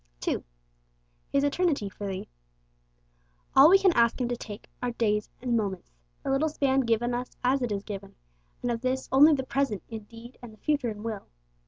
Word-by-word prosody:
2. - - -1 0.9
His 280 0 +2
Eternity 285 - +1
'for 200 +1 -6
thee.' 190 -1 -5 1.3
All 275 +4 +9
we 385 - +8
can 385 -2 +4
ask 235 -2 +3
Him 250 - 0
to 245 - 0
take 215 -2 -9
are 245 - 0
days 210 -3 0
and 245 -2 +1
moments 195 - -2 0.3
the - - -1
little 285 +4 +2
span 275 -3 +1
given 240 -1 +1
us 245 +1 -4
as 260 +2 +2
it 245 -3 -1
is 200 -1 -2
given, 200 -2 -7 0.5
and 245 - 0
of 230 -1 -2
this 260 +1 -1
only 295 +4 +7
the 265 - -2
present 260 - -1
in 220 -2 -7
deed 230 +3 -13
and 240 -2 -9
the 215 - -17
future 290 -1 0
in 210 -1 -7
will. 220 -3 -5
240 Hz, 195 wpm, -28 LUFS, 215-270 Hz, 1.3 s, All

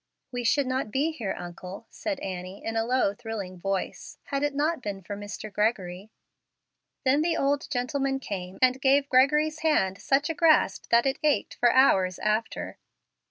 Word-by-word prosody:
"We 245 -1 -3
should 280 +4 +2
not 255 -3 -1
be 280 +8 0
here, 220 -11 -4
uncle," 180 +4 -8
said 300 -3 -4
Annie, 185 0 -6
in 225 - -3
a 225 - +2
low, 250 -4 +2
thrilling 205 -4 -6
voice, 195 +1 -3
"had 275 -1 -3
it 290 -1 0
not 305 +1 0
been 200 -3 -5
for 205 +4 -6
Mr. 205 +1 -7
Gregory." 200 -2 -1 1.0
Then 270 +3 +4
the 330 +1 +1
old 280 +1 0
gentleman 270 +1 -1
came 190 -6 -6
and 255 +1 +3
gave 275 +1 +3
Gregory's 300 +4 +3
hand 200 -12 +1
such 280 +2 +2
a 325 - -1
grasp 325 -2 +3
that 235 +2 +4
it 270 0 0
ached 300 -2 +1
for 240 -1 +3
hours 190 -9 +4
after. 215 +1 -2
245 Hz, 170 wpm, -27 LUFS, 200-280 Hz, 1.0 s, Then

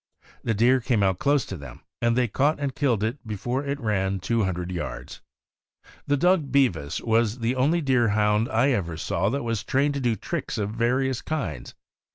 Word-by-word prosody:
The 115 - 0
deer 125 +5 +4
came 115 -4 +1
out 95 -2 +1
close 140 -2 +2
to 95 - -6
them, 70 -7 -10 0.2
and 120 0 +2
they 125 -1 +3
caught 145 +8 +1
and 140 -2 -2
killed 125 -7 +1
it 115 +6 -2
before 120 +6 -2
it 140 0 -3
ran 95 -5 0
two 115 +3 0
hundred 90 -1 -3
yards. 90 - -6 0.9
This 145 - +2
dog 170 -2 +2
Bevis 85 - +1
was 115 0 +1
the 120 +1 -1
only 150 +7 +2
Deerhound 110 -5 +2
I 120 +5 +2
ever 85 -9 -1
saw 90 +4 0
that 140 +3 -2
was 115 -3 -2
trained 140 +2 +1
to 140 - -2
do 120 -4 +1
tricks - - -4
of 105 -1 -2
various 125 +3 0
kinds. 95 - -4
115 Hz, 190 wpm, -25 LUFS, 100-135 Hz, 0.9 s, deer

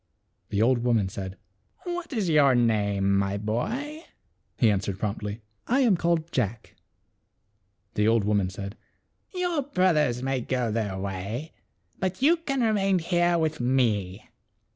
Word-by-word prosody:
The 105 +1 +1
old 125 +1 +3
woman 115 -5 +1
said, 95 0 -6 0.5
"What 350 -2 -4
is 220 -8 -1
your 145 -5 +5
name, 100 -4 +2
my 100 0 -1
boy? 245 - -3 0.3
" - - -46
He 115 -3 +4
an 100 - +1
swered 100 -1 -4
promptly, 105 +1 -4
" - - -45
I 260 +4 +3
am 235 -7 +4
called 170 -1 0
Jack." 105 +2 -2 1.2
The 105 0 +2
old 115 -1 +3
woman 100 -2 +1
said, 100 +2 -7 0.3
" - - -27
Your 355 -4 0
brothers 160 - +1
may 135 -1 0
go 125 -2 -1
their 105 -4 -2
way, 100 - -4 0.5
but 185 0 -2
you 320 +6 +4
can 275 -5 -2
remain 200 -4 +2
here 175 0 +2
with 160 -1 -1
me. 110 -7 0
125 Hz, 155 wpm, -26 LUFS, -, 1.2 s, your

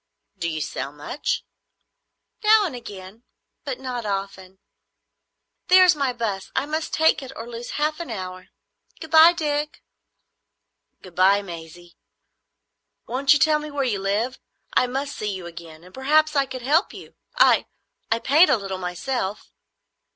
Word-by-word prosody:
"Do 170 -3 -3
you 155 -1 -3
sell 140 - -4
much?" 150 - -3 1.0
"Now 425 0 +6
and 315 -9 -4
again, 200 -2 -10 0.4
but 270 -4 -5
not 250 -2 -4
often. 195 -2 -5 1.1
There 370 0 +7
is 355 - +5
my 275 -3 0
"bus. 220 -6 -4
I 265 - +1
must 310 +1 -3
take 320 -1 +3
it 265 -1 -8
or 225 - -7
lose 240 0 -7
half 305 +2 0
an 340 - -6
hour. 185 -4 -6 0.5
Good 320 - -9
bye, 320 +2 +8
Dick." 300 -3 -3 1.2
"Good 185 - -12
bye, 195 +3 +4
Maisie. 170 -1 -11 1.1
Won't 265 +3 +3
you - - +3
tell 300 +2 +3
me 300 0 -7
where 285 -1 -2
you 225 -6 -1
live? 210 +7 -1 0.3
I 255 - +3
must 275 +3 -4
see 210 -1 -3
you 190 -2 -6
again; 165 -1 -11
and 180 - -16
perhaps 305 +3 +2
I 275 -1 +2
could 260 -2 -7
help 305 - +2
you. - - -12 0.2
I—I 230 - +1
paint 305 +6 +5
a 270 - +4
little 195 -2 -5
myself." 190 +4 -4
245 Hz, 155 wpm, -23 LUFS, 190-295 Hz, 1.2 s, bye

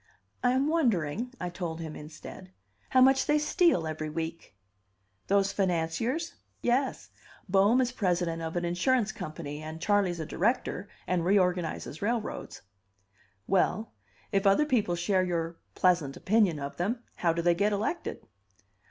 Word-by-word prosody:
"I 250 0 +4
am 265 +2 +2
wondering," 235 - +1
I 180 - -3
told 170 -2 -4
him 160 -2 -6
instead, 155 +4 -10 0.4
"how 260 - +4
much 265 +1 +5
they 300 - +4
steal 300 - +3
every 155 0 -4
week." 165 -7 -5 0.7
"Those 200 0 +3
financiers?" 195 - -1 0.3
"Yes. 255 +3 0 0.4
Bohm 200 +6 +4
is 250 -1 0
president 175 -7 0
of 160 +1 -4
an 175 0 0
insurance 210 +6 +1
company, 155 -1 -6
and 155 +1 -7
Charley's 195 -2 +1
a 160 - -3
director, 200 +1 -1 0.2
and 180 -2 0
reorganizes 180 -4 0
railroads." 225 +1 -3 0.8
"Well, 195 +4 +1 0.4
if 195 0 +2
other 195 +10 +5
people 220 -11 +1
share 185 +2 +1
your 170 -2 -2 0.2
pleasant 175 -7 +2
opinion 205 -5 +2
of 140 0 -6
them, 230 +7 -1
how 170 - +2
do 170 +1 -2
they 175 0 +5
get 200 +4 +1
elected?" 210 - -3
185 Hz, 145 wpm, -29 LUFS, 165-230 Hz, 0.8 s, much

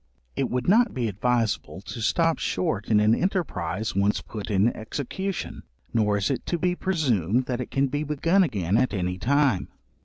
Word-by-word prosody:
It 135 - -1
would 125 0 -2
not 230 +6 +4
be 125 -3 0
advisable 115 -1 -1
to 115 +3 -7
stop 165 +8 +2
short 95 +3 -1
in 105 -2 +4
an 105 +1 +4
enterprize 110 - -1
once 100 +1 +2
put 105 -1 -7
in 105 +3 +2
execution, 150 - -4 0.3
nor 105 -3 +2
is 100 +6 0
it 135 - -2
to 175 - 0
be 180 +1 +1
presumed 130 - +1
that 125 0 -2
it 125 - -6
can 135 0 +1
be 145 +2 -2
begun 160 +6 +2
again 105 - +1
at 125 -3 +1
any 90 -1 -2
time. 140 -5 +2
120 Hz, 180 wpm, -25 LUFS, 105-150 Hz, 0.3 s, not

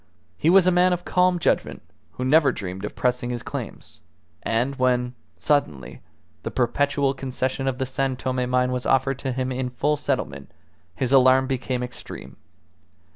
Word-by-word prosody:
He 150 - +1
was 190 0 +6
a 185 - +4
man 180 +1 +4
of 175 0 -4
calm 180 0 +3
judgment, 170 - 0 0.3
who 125 - -4
never 145 +2 +5
dreamed 95 0 -6
of - - -7
pressing 125 -1 0
his 120 -1 -4
claims; - - -7 0.4
and 120 +5 0
when, 125 -1 +1 0.2
suddenly, 75 - -1 0.4
the - - -4
perpetual 140 +2 +1
concession 135 0 -3
of 130 -1 -1
the 130 - -1
San 135 0 -1
Tome 125 0 -2
mine 125 0 +2
was 125 0 -2
offered 135 0 +2
to 130 - -2
him 130 +1 -2
in 130 0 -2
full 145 +4 0
settlement, 140 -2 -3 0.5
his 130 +5 -1
alarm 130 0 +6
became 130 -1 -2
extreme. 125 - -8
130 Hz, 165 wpm, -24 LUFS, 125-140 Hz, 0.5 s, was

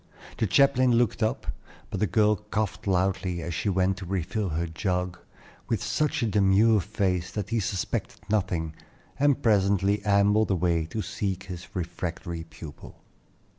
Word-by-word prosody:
The 110 - +2
chaplain 130 +3 +4
looked 120 -1 +2
up, 110 - 0 0.5
but - - -3
the 105 - +2
girl 105 +4 +3
coughed 110 +1 -3
loudly, 90 -2 0
as 85 - -4
she 85 +4 -1
went 95 0 +1
to 95 - -7
refill 95 +2 -1
her 85 +2 -1
jug, 90 +1 -2 0.5
with - - 0
such 150 -3 0
a - - +3
demure 105 +1 +4
face 95 -2 -1
that 105 -2 -3
he 115 0 +1
suspected 95 -2 -2
nothing, 90 -6 0 0.5
and 145 -1 +3
presently 100 -1 +3
ambled 105 +1 +3
away 85 -3 +1
to 110 +6 -3
seek 95 -2 -3
his 90 -3 -8
refractory 85 -1 -4
pupil. 80 -3 -11
95 Hz, 150 wpm, -27 LUFS, 90-105 Hz, 0.5 s, chaplain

